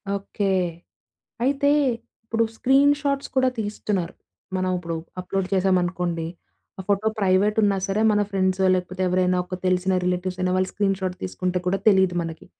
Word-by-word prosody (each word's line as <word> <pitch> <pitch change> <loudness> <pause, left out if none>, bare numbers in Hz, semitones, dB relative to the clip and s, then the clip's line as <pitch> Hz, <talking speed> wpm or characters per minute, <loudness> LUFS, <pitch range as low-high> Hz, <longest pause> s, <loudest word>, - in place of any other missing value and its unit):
Okay. 200 0 -2 1.0
అయితే 280 +2 +2 0.6
ఇప్పుడు 225 0 +1
screenshots 280 +2 +2
కూడా 260 0 +4
తీస్తున్నారు. 205 -4 -2 0.4
మనం 185 0 0
ఇప్పుడు 170 -1 -4 0.2
అప్‌లోడ్ 185 +1 -2
చేశామనుకోండి, 180 -3 +1 0.5
ఆ - - -5
ఫోటో 205 +2 +2
ప్రైవేటున్నా 200 +2 +3
సరే, 200 +3 0
మన 210 - +2
ఫ్రెండ్సో 190 -1 +1
లేకపోతే 185 +1 -3
ఎవరైనా 180 0 +2
ఒక 185 0 -6
తెలిసిన 185 +1 +2
రిలేటివ్స్ 180 +1 -1
అయినా 185 0 +1
వాళ్ళు 185 0 0
స్క్రీన్‌షాట్ 195 -2 -1
తీసుకుంటే 180 - -2
కూడా 195 +2 +1
తెలీదు 190 -3 +4
మనకి. 165 -1 -7
190 Hz, 135 wpm, -23 LUFS, 180-205 Hz, 1.0 s, కూడా